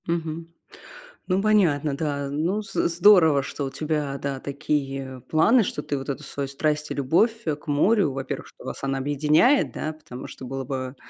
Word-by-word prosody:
Мгм. 165 -1 -3 0.8
Ну, 185 +1 +1
понятно, 165 -9 +2
да. 140 -2 -2
Ну, 165 +9 -1
з - - -1
здорово, 170 -5 +6
что 140 - -4
у - - -3
тебя, 150 -3 -2
да, 140 -1 -3
такие 135 -2 -3
планы, 220 +10 +4
что 150 - -3
ты 145 - -2
вот 135 +1 -6
эту 140 +2 -4
свою 140 0 -4
страсть 150 +2 -1
и - - 0
любовь 215 - +2
к 150 -2 -3
морю. 155 +4 +3
Во-первых, 135 0 -5
что - - -16
вас - - -6
она 135 0 -1
объединяет, 150 - +3
да, 155 - -3
потому 130 -5 -10
что 130 - -10
было 135 +1 -5
бы 130 0 -4
150 Hz, 180 wpm, -24 LUFS, 135-165 Hz, 0.8 s, здорово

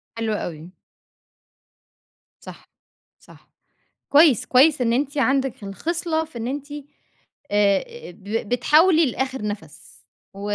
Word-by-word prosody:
حلو 225 -1 -2
أوي. 170 -3 -6 1.7
صح، - - -13 0.5
صح - - -20 0.6
كويس، 290 -5 +4
كويس 275 +3 +4
إن 235 -2 +1
أنتِ 280 +3 -1
عندِك 270 -4 0
الخِصلة 320 - -2
في 310 -7 -11
إن 230 - -4
أنتِ 285 +2 -6
أ 295 - -5 0.7
أ 205 - 0
ب 205 +3 -5
بتحاولي 315 - +4
لآخر 265 -2 -3
نفس 205 0 -8 0.3
و 195 - -11
260 Hz, 115 wpm, -22 LUFS, 210-300 Hz, 1.7 s, كويس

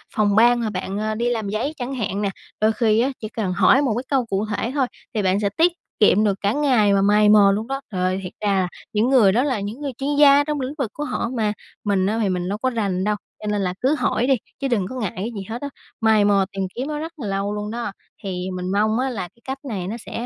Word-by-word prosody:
phòng 205 -2 +2
ban 240 +2 +5
mà 225 - -1
bạn, 190 0 -4
a, 215 0 -1
đi 235 +2 0
làm 220 -4 -2
giấy 230 +9 -2
chẳng 260 +1 -4
hạn 205 -4 -2
nè, 200 - 0 0.3
đôi 215 +1 +4
khi 220 -1 +2
á, 255 +4 +2
chỉ 215 - -6
cần 205 -5 -2
hỏi 200 +9 +5
một 260 -6 +1
cái 250 - -2
câu 265 -4 +2
cụ 205 -1 -1
thể 215 +3 -2
thôi 265 -3 +2 0.3
thì 215 - 0
bạn 190 +1 +2
sẽ 205 - +1
tiết 340 +2 +5 0.3
kiệm 210 0 +5
được 200 -2 +1
cả 200 +2 +1
ngày 250 -9 +3
mà 195 - +3
mày 210 +1 +4
mò 205 -2 +7
luôn 215 +4 -2
đó. 270 +1 -3
Trời 185 -2 -3
ơi, 185 +1 0
thiệt 180 - -7
ra 195 -3 +1 0.3
những 220 +4 +2
người 230 -8 +6
đó 240 +6 +2
là 260 -7 0
những 210 +8 -6
người 280 - -3
chuyên 285 +1 -1
gia 285 -1 +7
trong 295 -1 -2
lĩnh 260 +3 -3
vực 260 -8 -2
của 295 - -4
họ 235 - -2
mà, 210 -1 +1 0.3
mình 200 -3 +1
á 215 +3 0
thì 205 - +1
mình 180 -1 -2
đâu 205 - -2
có 260 +4 0
rành 200 -6 -1
đâu, 210 +1 +1 0.3
cho 210 - -5
nên 210 -1 0
là 180 -2 -1
cứ 275 +4 +3
hỏi 250 -4 0
đi, 270 - +5 0.3
chứ 275 - -1
đừng 220 -7 +1
có 260 - -7
ngại 215 -7 -2
cái 210 +6 -3
gì 200 - -4
hết 235 +2 -5
á, 285 - -4 0.3
mày 220 -2 +4
mò 200 -1 +3
tìm 195 -1 -3
kiếm 260 +4 -3
nó 300 -1 -3
rất 325 +2 -6
là 230 - -4
lâu 195 +1 -1
luôn 210 0 -4
đó, 235 -2 -3 0.3
thì 185 -1 -3
mình 180 0 -3
mong 215 +3 +2
á 265 +1 0
là 225 -6 -4
cái 235 - -28
cách 270 0 -4
này 195 -8 -4
nó 220 - -3
sẽ 235 - -5
215 Hz, 285 wpm, -22 LUFS, 200-255 Hz, 0.3 s, mò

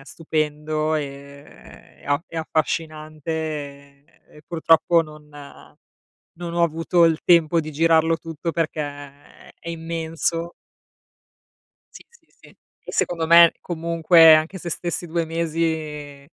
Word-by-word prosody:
stupendo, 155 +1 -2
ehm, 140 -1 -8
e - - -18
a 145 +1 +1
e - - -11
affascinante 155 -1 -3 1.0
e 150 - -18
purtroppo 165 +1 +3
non 150 -1 -10 1.1
non 170 0 -6
ho 170 - +1
avuto 165 +1 +2
il 165 -1 +2
tempo 170 -1 +4
di 155 0 -7
girarlo 165 +1 +2
tutto 165 0 -6
perché, 160 -1 -2
ehm, 145 -1 -10
è 170 - -10
immenso. 165 0 -3 1.4
Sì, - - -14
sì, 470 - -26
sì. - - -22 0.4
E - - -7
secondo 165 -2 -1
me 170 +1 +7
comunque 165 -1 +5
anche 160 +5 0
se 175 - -7
stessi 175 +1 -4
2 170 +1 -2
mesi 155 -3 -3
160 Hz, 120 wpm, -22 LUFS, 155-170 Hz, 1.4 s, me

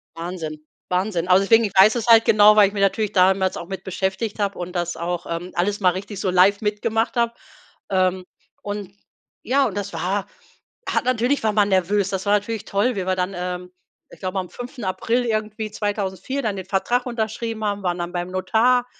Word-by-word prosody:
Wahnsinn, 165 -2 -5 0.3
Wahnsinn, 180 -1 -1
also 185 +1 +5
deswegen, 225 +3 +5
ich 200 - -4
weiß 205 +4 +7
es 235 -2 -2
halt 230 -1 +7
genau, 210 0 +6
weil 210 -2 +7
ich 200 - -7
mir 205 - -3
natürlich 200 +2 +1
damals 190 -1 +3
auch 170 - -7
mit 190 -1 -6
beschäftigt 190 +3 -3
habe 200 -1 -1
und 180 0 -6
das 175 -1 -2
auch, 175 +1 -3
ähm, 170 +2 -4
alles 200 +4 0
mal 185 -3 +4
richtig 195 +2 -6
so 195 - -1
live 185 +3 +4
mitgemacht 220 +2 -1
habe. 235 0 +1 0.6
Ähm, 185 -1 +1 0.4
und 205 -2 -6 0.5
ja, 270 +3 +2
und 205 - -6
das 200 0 -4
war 195 +2 -2 0.6
ha, - - +1
natürlich 255 +1 +1
war 220 - +2
man 205 -1 +3
nervös. 195 +1 +1
Das 190 0 -3
war 205 - +3
natürlich 210 +1 -3
toll, 215 +5 0
wie 190 -2 -3
wir 185 - +1
dann, 185 +1 -2
ähm, 180 0 -5 0.4
ich - - -15
glaube 190 0 -3
am 180 -1 -5
5.4. 245 -1 -2
irgendwie, 215 -1 -2
2004 205 +5 -3
dann 215 -6 -2
den 190 - -6
Vertrag 205 +6 0
unterschrieben 225 -1 -3
haben, 205 -1 -2
waren 175 -1 -1
dann 175 +1 -4
beim 175 0 -3
Notar 240 +6 +2
200 Hz, 200 wpm, -22 LUFS, 185-220 Hz, 0.6 s, weiß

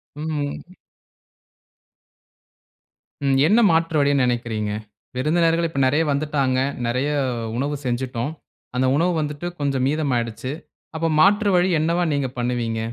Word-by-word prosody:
ம். 150 +3 -4 2.5
ம். 135 -1 +3
என்ன 220 +6 +4
மாற்று 165 0 +1
வழின் 140 -1 +3
நெனைக்கிறீங்க? 115 -4 -1 0.4
விருந்தினர்கள் 165 +4 +2
இப்ப 140 -4 -4
நெறைய 150 +5 +2
வந்துட்டாங்க, 140 -3 0 0.3
நெறைய 125 +5 0 0.5
உணவு 145 +3 -1
செஞ்சுட்டோம். 125 +2 -2 0.4
அந்த 130 +1 +2
உணவு 175 +3 +2
வந்துட்டு 150 +3 -4
கொஞ்சம் 135 -2 0
மீதம் 150 -1 0
ஆயிடுச்சு. 115 +2 -3 0.4
அப்ப 165 +1 0
மாற்று 205 +4 +4
வழி 180 +1 +3
என்னவா 170 +3 +1
நீங்க 140 -2 0
பண்ணுவீங்க? 120 -2 -1
145 Hz, 115 wpm, -22 LUFS, 125-160 Hz, 2.5 s, என்ன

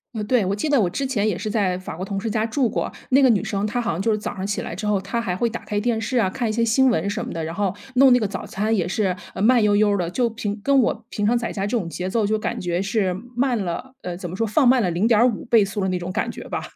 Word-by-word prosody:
呃， 215 - -2
对。 225 -2 +2
我 195 - 0
记 250 +9 -2
得 285 - +4
我 190 -5 +2
之 275 +10 -3
前 225 -6 0
也 195 -5 0
是 215 +3 -4
在 195 -5 +1
法 185 - -7
国 185 - -4
同 195 0 -3
事 220 +1 -3
家 220 0 0
住 240 +1 0
过。 - - -2 0.2
那 270 +2 +5
个 260 - +6
女 215 -5 +3
生， 200 +1 -1
她 240 +3 -1
好 230 - -1
像 170 +3 -3
就 225 - 0
是 210 - +1
早 210 - -5
上 190 0 -4
起 205 - -2
来 - - -6
之 210 +4 -4
后 205 -2 +2
她 200 +5 -3
还 180 -5 -2
会 235 +4 0
打 230 - -6
开 210 - -3
电 225 +1 0
视 245 +4 -2
啊， 210 -5 +3
看 235 +4 -2
一 - - -1
些 230 +1 +1
新 255 +4 +4
闻 200 -5 0
什 215 +3 -3
么 - - -6
的， 165 -1 -3
然 160 - -4
后 195 0 -1 0.2
弄 265 0 +7
那 - - +6
个 215 - -1
早 195 -1 -4
餐 215 +3 -1
也 180 -4 0
是， 190 0 0 0.2
呃， 190 - -5
慢 235 +2 +5
悠 210 -1 +3
悠 205 -1 +3
的。 175 -2 -1
就 240 +5 0
平 215 -2 -4
跟 275 +1 +4
我 230 -2 0
平 210 - -2
常 235 +3 +3
在 235 - -3
家 200 -1 -2
这 235 - 0
种 180 -7 -3
节 180 +2 -4
奏 220 +1 +1
就 215 +1 0
感 - - -3
觉 175 0 -1
是 195 -2 0 0.2
慢 250 -1 +1
了， 215 +10 -5
呃， 180 -1 -4
怎 180 0 -6
么 180 - -6
说 225 - 0
放 265 +7 +3
慢 250 0 +5
了 185 - +1
0.5 220 +5 +2
倍 230 -3 +4
速 195 +1 -4
的 190 - 0
那 180 -1 -1
种 175 +1 -5
感 220 - -1
觉 - - -9
吧。 - - -3
210 Hz, 345 characters per minute, -22 LUFS, 190-235 Hz, 0.2 s, 弄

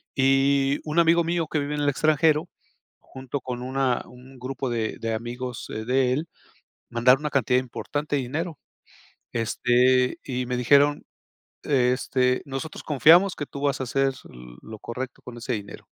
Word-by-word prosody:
y 135 +1 +3
un 155 +1 -4
amigo 170 0 +5
mío, 170 0 0
que 155 - -1
vive 145 +1 -3
en 145 - -2
el 145 - +2
extranjero, 155 +3 +2 0.5
junto 130 +1 -7
con 125 -1 -5
una 130 0 0
un 125 +1 -15
grupo 130 +1 -4
de 115 -2 -2
de 115 0 -2
amigos 120 +2 -5
de 125 +3 0
él, 150 +5 -2 0.6
mandaron 125 +3 +4
una 150 - -1
cantidad 125 -2 +2
importante 145 +4 -4
de 140 - 0
dinero, 155 +6 -4 0.8
este, 125 +2 +2
y 125 -1 -3
me 125 0 -2
dijeron: 140 +4 +4 0.6
"Este, 125 -1 +1
nosotros 140 +3 -6
confiamos 165 +6 +5
que 145 - -4
tú 140 - -8
vas 140 -2 0
a - - -1
hacer 135 +2 +1 0.5
lo 110 0 -10
correcto 125 +2 -6
con 120 -1 -10
ese 120 +1 -3
dinero". 100 -2 -8
135 Hz, 160 wpm, -25 LUFS, 125-145 Hz, 0.8 s, amigo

